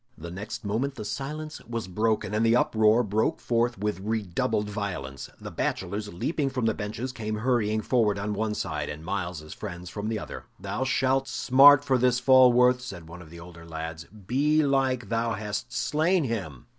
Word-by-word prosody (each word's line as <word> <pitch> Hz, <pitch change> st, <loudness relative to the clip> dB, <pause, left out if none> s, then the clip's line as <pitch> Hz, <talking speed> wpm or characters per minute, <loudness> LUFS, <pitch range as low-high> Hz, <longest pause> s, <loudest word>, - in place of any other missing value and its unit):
The 85 Hz, +1 st, -8 dB
next 105 Hz, +4 st, -6 dB
moment 125 Hz, +7 st, -1 dB
the 110 Hz, -, -6 dB
silence 150 Hz, +6 st, -5 dB
was 115 Hz, -3 st, -4 dB
broken, 105 Hz, +1 st, 0 dB
and 110 Hz, +1 st, +1 dB
the 115 Hz, 0 st, +4 dB
uproar 110 Hz, 0 st, +4 dB
broke 105 Hz, +1 st, 0 dB
forth 120 Hz, 0 st, 0 dB
with 105 Hz, 0 st, -2 dB
redoubled 105 Hz, 0 st, -1 dB
violence. 95 Hz, -11 st, -5 dB
The -, -, -8 dB
bachelors, 100 Hz, +3 st, -3 dB
leaping 140 Hz, -, -1 dB
from 130 Hz, -3 st, -2 dB
the 110 Hz, -, +2 dB
benches, 110 Hz, +5 st, -4 dB
came 110 Hz, -3 st, -4 dB
hurrying 110 Hz, -2 st, +1 dB
forward 110 Hz, -3 st, +2 dB
on 105 Hz, +1 st, -2 dB
one 105 Hz, +1 st, -1 dB
side, -, -, -3 dB
and 80 Hz, +2 st, -7 dB
Myles's 85 Hz, -5 st, -4 dB
friends 90 Hz, -4 st, -7 dB
from 105 Hz, +1 st, -4 dB
the 110 Hz, -, -1 dB
other. -, -, -7 dB
"Thou 130 Hz, -, -3 dB
shalt 130 Hz, 0 st, +1 dB
smart 145 Hz, +2 st, +6 dB
for 130 Hz, -2 st, +2 dB
this, 125 Hz, 0 st, +3 dB
Falworth," 125 Hz, -1 st, +6 dB
said 95 Hz, -10 st, -8 dB
one 85 Hz, +2 st, -10 dB
of 80 Hz, -, -13 dB
the 85 Hz, +1 st, -11 dB
older 85 Hz, -1 st, -12 dB
lads. 80 Hz, 0 st, -6 dB
"Belike 135 Hz, +1 st, +1 dB
thou 115 Hz, 0 st, 0 dB
hast 105 Hz, +3 st, -4 dB
slain 155 Hz, +8 st, +1 dB
him!" 100 Hz, -, -4 dB
110 Hz, 180 wpm, -27 LUFS, 100-125 Hz, -, smart